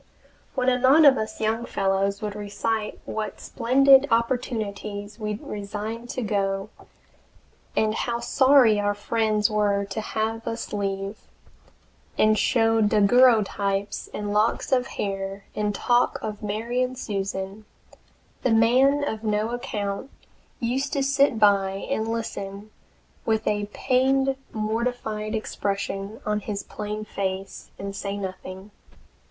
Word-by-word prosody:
When 255 -1 0
a 250 -1 +3
knot 275 +5 +6
of 275 -2 +8
us 220 -3 -4
young 225 +2 0
fellows 195 -1 0
would 210 -1 -2
recite 210 +1 -3
what 215 -2 -4
splendid 270 +3 +4
opportunities 215 -3 -2
we 210 -1 -2
resigned 210 +3 -6
to 250 - -3
go, 195 -1 -1 1.1
and 215 0 +2
how 235 +1 -2
sorry 250 -2 +5
our 205 0 0
friends 215 0 +1
were 205 -1 +1
to 220 - -4
have 225 +1 -3
us 230 -1 -4
leave, 195 0 -3 1.0
and 215 0 +4
show 225 0 +3
daguerreotypes 205 -2 +3
and 205 0 -3
locks 210 +2 +1
of 255 -1 +2
hair, 195 0 -4
and 210 -1 -1
talk 240 +3 +2
of 210 -1 -5
Mary 225 +4 -2
and 255 0 -1
Susan, 195 -1 -4 0.8
the - - +1
man 255 +6 +4
of 220 0 -4
no 215 0 0
account 215 -2 -3 0.5
used 260 +4 -1
to 280 - +1
sit 275 -2 +3
by 200 -2 +4 0.2
and 220 -5 0
listen 210 -2 -5 0.5
with 220 -1 0
a 205 -1 0
pained, 270 +2 +2 0.2
mortified 220 0 -2
expression 200 -1 -3
on 210 0 0
his 205 -1 -4
plain 210 0 -5
face, 195 -1 -4
and 195 0 -6
say 200 0 -4
nothing. 190 +1 -7
215 Hz, 125 wpm, -25 LUFS, 200-235 Hz, 1.1 s, of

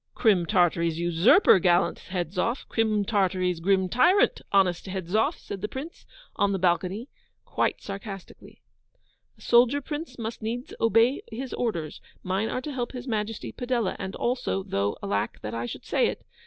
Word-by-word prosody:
'Crim 190 -7 +3
Tartary's 170 -2 +2
usurper, 175 - +5
gallant 175 +1 +2
Hedzoff! 185 - -2
Crim 215 -2 +1
Tartary's 185 -4 +1
grim 190 +2 +2
tyrant, 350 - +3
honest 190 -2 +2
Hedzoff!' 190 +3 0
said 195 - -8
the 210 - -2
Prince, 280 +9 -8 0.3
on 200 0 +1
the - - 0
balcony, 185 +5 0 0.4
quite - - -1
sarcastically. 195 -1 -9 0.7
'A - - -22
soldier, 245 +4 +4
Prince, 295 -1 -6
must 230 0 -5
needs 235 +4 -4
obey 230 +4 +3
his 250 +3 -5
orders: 170 -11 -3 0.2
mine 190 +4 -1
are 255 - -2
to 295 - -5
help 245 -1 -3
His 250 0 -7
Majesty 215 -1 -3
Padella. 245 -5 -1
And 190 0 -5
also 165 - -1
(though 100 +2 -1
alack 100 0 -2
that 105 +1 -5
I 115 +1 -3
should - - -8
say - - +2
it!) - - -5
200 Hz, 155 wpm, -26 LUFS, 180-240 Hz, 0.7 s, usurper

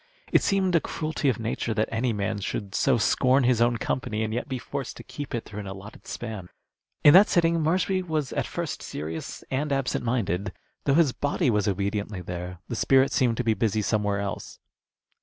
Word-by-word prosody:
It - - +5
seemed 190 -2 +1
a 170 - +5
cruelty 155 -2 -1
of 125 - 0
nature 115 0 -2
that 110 +1 +1
any 115 +2 0
man 105 0 -2
should 100 0 -4
so 135 -3 +3
scorn 130 +4 +3
his 120 -2 +3
own 120 0 +3
company 110 -2 -2
and 110 0 -2
yet 120 - -3
be 130 - -2
forced 135 +1 -5
to - - -9
keep 145 -4 -6
it 115 - -4
through 105 0 -8
an 100 - -6
allotted 95 +3 -10
span. 105 -6 -6 0.5
In 145 - +9
that 195 +3 +8
sitting 165 -1 +3
Marshby 185 +4 +1
was 155 -4 -1
at - - -1
first - - -4
serious 80 +2 -6
and 145 +3 -1
absent 135 -3 0
minded. 100 -6 -1 0.3
Though 140 - +3
his 160 -4 +5
body 145 -1 0
was 105 -2 +1
obediently 100 0 -2
there, 90 +1 -6
the 120 - -4
spirit 135 +4 +4
seemed 120 -3 +2
to 125 - 0
be 115 -2 +3
busy 110 -1 0
somewhere 105 -1 0
else. 100 0 -5
115 Hz, 200 wpm, -26 LUFS, 105-140 Hz, 0.5 s, In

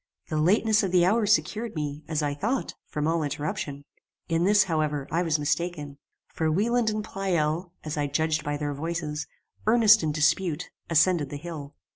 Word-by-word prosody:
The 155 - -1
lateness 215 +6 +3
of 195 -4 -1
the 180 -1 +4
hour 210 +3 +2
secured 215 +1 +1
me, 150 -1 -3
as 155 -1 -1
I 145 -1 0
thought, 225 - -2
from 150 0 -2
all 165 +1 +1
interruption. 145 -1 -4 0.4
In 165 +1 +1
this, 205 +1 +5
however, 155 -4 -1
I 170 - +1
was 165 -3 +1
mistaken, 150 -1 -2 0.3
for 160 -1 0
Wieland 225 +6 +2
and 215 0 -2
Pleyel, 175 -4 -1
as 155 0 -4
I 145 -1 0
judged 155 +2 0
by 145 0 -2
their 145 -1 -2
voices, 155 0 -4 0.4
earnest 220 -1 +6
in 155 -2 0
dispute, 155 +2 0 0.2
ascended 165 -2 +3
the 145 - -5
hill. 150 -2 -8
160 Hz, 175 wpm, -26 LUFS, 150-190 Hz, 0.4 s, earnest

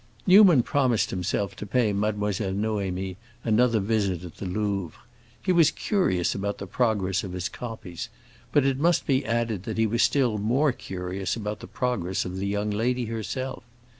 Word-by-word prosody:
Newman 185 - +7
promised 130 -5 +1
himself 95 +2 -2
to - - -7
pay 110 +1 +1
Mademoiselle 105 -1 -1
Noémie 95 -3 -2 0.3
another 115 +1 +3
visit 100 -4 0
at 85 -3 -10
the 95 - -5
Louvre. 100 -2 -2 0.4
He 185 - +2
was 170 -4 +6
curious 130 - 0
about 100 +1 -3
the 100 - -6
progress 100 -4 0
of 95 -3 -6
his 90 0 -2
copies, 110 -8 -7 0.4
but 145 - +3
it 135 -1 +1
must 170 +3 +2
be 135 -2 +2
added 115 -3 -1
that 110 - -4
he 110 - +3
was 115 +2 +1
still 125 -7 +2
more 130 +8 +2
curious 95 -3 -4
about 105 -2 -4
the - - -9
progress 120 -8 -1
of 90 +1 -5
the 100 +1 -2
young 105 +1 -1
lady 120 +4 0
herself. 115 +4 -4
105 Hz, 170 wpm, -26 LUFS, 95-125 Hz, 0.4 s, Newman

